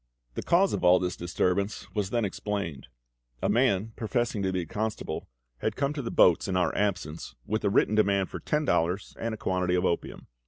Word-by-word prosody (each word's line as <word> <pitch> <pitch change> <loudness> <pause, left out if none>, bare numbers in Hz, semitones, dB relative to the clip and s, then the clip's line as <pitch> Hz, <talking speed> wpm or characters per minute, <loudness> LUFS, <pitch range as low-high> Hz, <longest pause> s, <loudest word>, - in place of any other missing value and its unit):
The - - -3
cause 190 +3 +3
of - - -2
all 90 +1 +7
this 90 0 -2
disturbance 90 +3 -1
was 105 -3 -1
then 115 0 +1
explained. 95 -8 -4 0.6
A - - +2
man 110 -3 +2
professing 115 -1 -1
to 95 -1 0
be 90 -1 -1
the 85 - -13
constable 110 0 -3 0.3
had 110 +6 -1
come 140 +1 0
to 150 - -3
the 115 - -4
boats 90 +2 +4
in 95 -1 0
our 90 - +1
absence, 90 -6 -2
with 110 +1 -1
a 100 - +3
written 100 - +3
demand 100 -3 +2
for - - -5
ten 150 0 0
dollars 90 -1 0
and 115 - -2
a 110 - -4
quantity 90 -2 0
of 90 +1 +1
opium. 85 - -2
100 Hz, 205 wpm, -28 LUFS, 90-110 Hz, 0.6 s, all